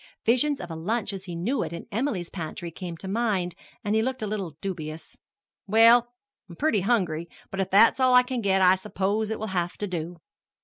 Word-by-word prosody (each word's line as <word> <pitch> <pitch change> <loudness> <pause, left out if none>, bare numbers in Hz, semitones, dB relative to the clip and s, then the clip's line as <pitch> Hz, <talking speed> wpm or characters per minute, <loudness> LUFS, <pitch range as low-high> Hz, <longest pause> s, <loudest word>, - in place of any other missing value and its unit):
Visions 260 +5 +2
of 175 -1 -7
a - - -5
lunch 205 +5 -2
as 190 0 -7
he 175 -2 -6
knew 215 +12 -1
it 160 - -3
in 170 - -7
Emily's 215 -6 -2
pantry 170 -1 -6
came 170 0 -7
to 190 - -11
him, 195 - -2 0.7
and 205 -1 -1
he 220 - +3
looked 255 0 -2
a - - 0
little 195 -7 -4
dubious. 160 -5 -6 0.5
"Well, 230 +3 +6 0.4
I'm 170 - -10
pretty 260 - +1
hungry; 175 -6 0 0.2
but 195 - -5
if 190 - 0
that's 225 +6 +5
all 255 -1 +5
I 250 - +8
can 250 -1 -3
get 190 -2 +2
I 180 0 +7
suppose 205 +2 -1
it 220 - -2
will 220 - -4
have 175 -1 -1
to 210 - -2
do." 175 -2 -4
195 Hz, 215 wpm, -26 LUFS, 175-230 Hz, 0.7 s, I